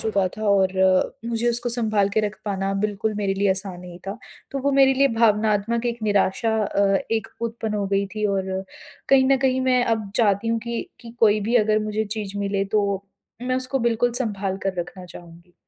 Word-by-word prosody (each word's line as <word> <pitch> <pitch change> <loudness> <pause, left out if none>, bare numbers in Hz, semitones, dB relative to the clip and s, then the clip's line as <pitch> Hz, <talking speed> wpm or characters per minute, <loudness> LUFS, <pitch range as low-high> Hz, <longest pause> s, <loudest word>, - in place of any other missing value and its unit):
चुका 200 -4 +1
था 215 - -6
और 190 -2 +3 0.5
मुझे 235 0 -1
उसको 240 +1 +1
सँभाल 215 -4 +2
के 220 - +3
रख 210 -1 -2
पाना 195 -1 -2
बिल्कुल 210 +1 -1
मेरे 200 -2 -1
लिए 200 +1 +1
आसान 190 -1 -1
नहीं 180 -1 -10
था। 195 - -4 0.3
तो 275 - -3
वो 280 - +2
मेरे 270 -1 +5
लिए 275 +1 +4
भावनात्मक 220 +1 +2
एक 235 -1 -3
निराशा 215 +2 +1
अ, 195 -1 +2
एक 225 0 -1
उत्पन्न 225 -2 -3
हो 200 -1 -1
गई 200 0 0
थी 215 -1 -2
और 190 0 -3 0.4
कहीं 270 -1 +5
न 275 - +5
कहीं 260 0 +1
मैं 255 -1 +2
अब 220 -4 -1
चाहती 210 -1 +2
हूँ 230 - +1
की 235 -1 -3 0.2
कि 235 -2 -10
कोई 215 -1 +4
भी 240 - +1
अगर 215 -1 +3
मुझे 215 +1 -1
चीज़ 205 -1 -5
मिले 200 -1 -1
तो 205 -1 +2 0.6
मैं 255 0 0
उसको 260 +1 -1
बिल्कुल 235 0 +1
सँभाल 195 -4 -3
कर 195 - -1
रखना 180 +1 -8
चाहूँगी। 175 0 -14
215 Hz, 200 wpm, -23 LUFS, 195-235 Hz, 0.6 s, मेरे